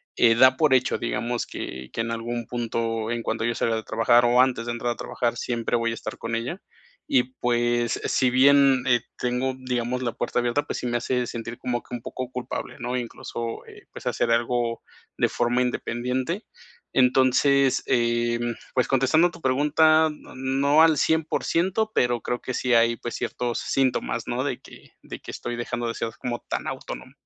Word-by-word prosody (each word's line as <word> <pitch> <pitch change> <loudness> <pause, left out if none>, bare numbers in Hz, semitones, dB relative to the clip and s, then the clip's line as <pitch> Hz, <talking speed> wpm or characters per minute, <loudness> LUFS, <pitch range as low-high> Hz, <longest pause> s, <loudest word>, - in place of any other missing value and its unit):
eh, 115 -1 +5
da 130 +2 +6
por 150 -1 +3
hecho, 130 0 +2
digamos 120 0 -2
que 65 0 -7
que - - -7
en 115 +1 -1
algún 115 0 -3
punto, 115 -1 -2
en 120 -1 -2
cuanto 110 0 -2
yo 120 0 0
salga 115 - 0
de 110 - -3
trabajar 115 +2 +3
o 120 +1 +4
antes 125 -2 +2
de - - -1
entrar 120 0 -2
a - - -18
trabajar, 120 -1 -2
siempre 120 -1 -2
voy 115 -1 +1
a 115 - -3
estar 110 - -7
con 115 0 -5
ella 125 - -4 0.5
y 125 - +4 0.2
pues, 120 -1 +1
si 130 - +2
bien 135 0 +5
,eh, 120 -2 +4 0.2
tengo, 125 +2 -1
digamos, 125 -1 -2
la 120 -2 -2
puerta 120 - -1
abierta, 120 +4 0
pues - - -4
sí 125 - -3
me 120 - -1
hace 125 +1 -1
sentir 120 0 -6
como 120 -1 -2
que - - -13
un 120 - -7
poco 130 +1 -6
culpable, 125 +2 -5
¿no? 125 +1 -3
Incluso, 115 -1 -5
eh, - - -15
pues, - - -11
hacer 115 - 0
algo 120 0 0 0.4
de - - +3
forma 120 +1 0
independiente. 125 - -2 0.5
Entonces, 130 +1 +3
em, 120 0 +1 0.2
pues 125 - +2
contestando 135 +6 +3
tu - - -14
pregunta, 155 +4 +4
no 150 - -14
no 135 +4 +3
al 160 -2 +5
100%, 170 +7 +1
pero 120 -1 +1
creo 120 - -2
sí 125 0 0
hay, 115 0 +4
pues 120 - -6
ciertos 120 -1 -2
síntomas, 135 -2 0
¿no? - - -1
De - - -3
que - - -15
de - - -9
que - - -9
estoy 120 0 -5
dejando 120 0 -3
de 115 - -3
ser 115 - -3
como 120 -1 -3
tan - - -3
autónomo. - - -6
120 Hz, 190 wpm, -25 LUFS, 120-130 Hz, 0.5 s, da